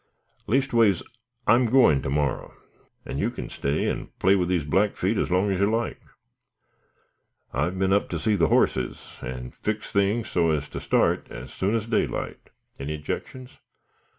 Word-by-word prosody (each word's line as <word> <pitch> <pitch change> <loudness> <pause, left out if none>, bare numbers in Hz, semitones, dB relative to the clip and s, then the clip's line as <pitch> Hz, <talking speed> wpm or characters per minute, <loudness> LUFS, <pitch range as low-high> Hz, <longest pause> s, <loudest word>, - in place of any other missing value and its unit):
Leastways, 115 -6 +3 0.4
I'm 120 +1 +5
goin' 115 - +5
to - - -3
morrow, 70 -1 -1 0.5
an' 70 - -4
you - - +1
kin - - -7
stay 70 +2 -1
and - - -4
play 95 +1 +4
with 90 -2 0
these 85 -5 +1
Blackfeet 95 +5 +1
as - - 0
long 95 +3 +2
as 95 - -1
you 100 +1 +3
like. 115 +1 -1 1.5
I've 75 +8 -1
been 95 0 +2
up 100 - +2
to 85 - -2
see 105 +7 +1
the 85 -5 +3
horses, 65 -4 0
and 60 -1 -6
fixed 110 0 -4
things 100 +3 +1
so 85 -2 +1
as 75 -2 0
to - - -5
start - - +1
as 65 +2 -9
soon 100 +4 0
as 110 -2 -1
daylight. 115 - -2 0.3
Any 75 +3 -3
'jections?" 125 - -6
95 Hz, 165 wpm, -25 LUFS, 75-110 Hz, 1.5 s, I'm